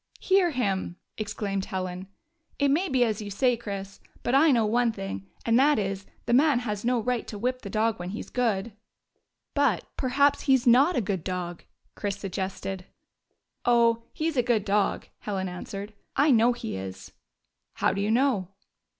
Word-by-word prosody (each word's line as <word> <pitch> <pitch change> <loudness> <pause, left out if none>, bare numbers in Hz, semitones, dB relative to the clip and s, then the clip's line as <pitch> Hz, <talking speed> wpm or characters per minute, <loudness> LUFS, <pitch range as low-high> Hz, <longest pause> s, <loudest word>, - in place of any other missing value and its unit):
" - - -25
Hear 380 -2 +3
him," 200 - -1 0.2
exclaimed 205 -2 -3
Helen. 185 -1 -4 0.3
" 335 -1 -49
It 285 -1 +2
may 350 +6 +1
be 255 -2 +3
as 220 -3 -1
you 205 - -6
say, 245 +5 +2
Chris. 200 -4 -6 0.2
But 240 - 0
I 295 +4 +6
know 235 -5 +4
one 235 +2 +2
thing, 95 - -6 0.2
and 230 +1 +4
that 295 +2 +5
is, 195 -1 -2 0.2
the - - 0
man 285 +1 +5
has 210 -4 -3
no 245 0 +2
right 245 +1 -1
to 210 - -6
whip 255 +4 -1
the 200 - -7
dog 220 +1 0
when 175 0 -5
he 210 - -5
's - - -17
good." 230 -3 0 0.4
" - - -47 0.3
But, 280 - +2
perhaps, 280 +2 +2
he 270 -2 +4
's 255 - -7
not 270 +8 +5
a - - +2
good 190 -4 -2
dog," 180 -2 -4 0.3
Chris 205 -1 -3
suggested. 190 -1 -4 0.4
" - - -47 0.3
Oh, 235 -1 +4
he 315 - -2
*s 320 - -6
a 250 - +4
good 230 -4 +1
dog," 205 0 +1
Helen 195 -2 -3
answered. 195 +3 -7 0.2
"I 290 +1 +4
know 235 0 +5
he 235 - -5
is." 95 0 -7 0.3
" - - -54
How - - +1
do 200 - -2
you 205 - 0
know 235 -5 +2
220 Hz, 200 wpm, -27 LUFS, 195-250 Hz, 0.4 s, I